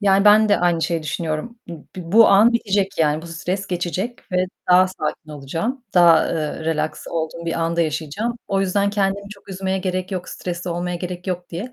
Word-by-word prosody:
Yani 195 -1 +3
ben 215 +1 +6
de 205 - +4
aynı 175 -2 +1
şeyi 165 0 -1
düşünüyorum. 160 +8 -4
Bu 165 -3 -9
bu 175 -1 -7
bu 225 +1 +8
an 215 +5 +6
bitecek 200 -5 0
yani 155 0 +2
bu 170 - -9
stres 180 +4 -4
geçecek 180 +6 -4
ve 180 0 +2 0.3
daha 185 +1 +6
sakin 155 -3 -5
olacağım, 165 - -4
daha, 170 -3 +6
ııı, 160 -1 -3
relaks 155 -1 -2
olduğum 170 +1 -4
bir 165 0 -1
anda 165 +1 0
yaşayacağım. 165 +9 -2
O 195 -1 +1
yüzden 200 +1 +1
kendimi 200 0 -1
çok 200 -1 -14
üzmeye 190 0 -2
gerek 185 0 -3
yok, 180 -1 -4
stresli 175 0 -5
olmaya 175 +1 -2
gerek 180 +1 -6
yok 180 -1 -4
diye 205 +9 -6
180 Hz, 195 wpm, -21 LUFS, 165-195 Hz, 0.3 s, bu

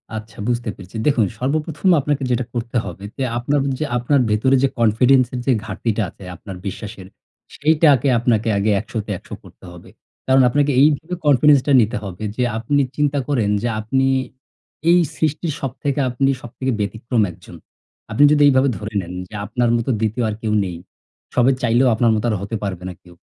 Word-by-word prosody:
আচ্ছা, 110 -1 -8
বুঝতে 120 -2 -1
পেরেছি। 95 +4 -14
দেখুন, 125 -7 +3
সর্বপ্রথম 150 +6 -1
আপনাকে 140 -1 -1
যেটা 125 0 0
করতে 120 0 -3
হবে 90 +3 -8
যে 135 - -1
আপনার 140 +4 0 0.2
যে 155 - -1
আপনার 135 +3 +2
ভেতরে 130 +6 +3
যে - - +5
confidence 125 +3 +4
এর 125 - -3
যে 135 - +3
ঘাটতিটা 115 -1 -2
আছে 100 - -15
আপনার 95 +1 -9
বিশ্বাসের, 100 -1 -7 0.5
সেইটাকে 150 -3 +3
আপনাকে 115 -2 +1
আগে 105 +2 +1
১০০ 110 +3 -7
তে 105 - -5
১০০ - - -9
করতে - - -18
হবে। 85 - -13 0.4
কারণ, 130 0 +5
আপনাকে 145 +2 +1
এইভাবে 155 +3 +2
confidence 145 0 +5
টা 145 - +2
নিতে 110 0 0
হবে 95 +1 -7
যে, 125 - 0
আপনি 140 +5 +1
চিন্তা 145 -1 +1
করেন 120 -8 0
যে 120 - -1
আপনি 130 +5 0 0.8
এই 175 +1 +6 0.2
সৃষ্টির 155 +1 -1
সবথেকে 140 +2 -3
আপনি 135 +2 +1
সবথেকে 130 +2 -4
ব্যতিক্রম 110 +3 -1
১ - - -15
জন। 85 - -12 0.6
আপনি 125 +7 +3
যদি 150 - +3
এইভাবে 135 0 +4
ধরে 105 +1 -7
নেন 90 0 -8 0.2
যে - - -17
আপনার 120 +3 0
মতো 115 +2 -3
২য় 115 +2 -1
আর 105 - -3
কেউ 110 -1 -1
নেই। 90 -2 -5 0.6
সবাই 125 +2 +4
চাইলেও 120 +2 +3
আপনার 115 0 +3
মতো 110 - -2
আর 105 - 0
হতে 100 +3 -4
পারবে 95 -3 -4
না 90 - -7
কেউ। 90 -1 -17
120 Hz, 185 wpm, -20 LUFS, 110-140 Hz, 0.8 s, এই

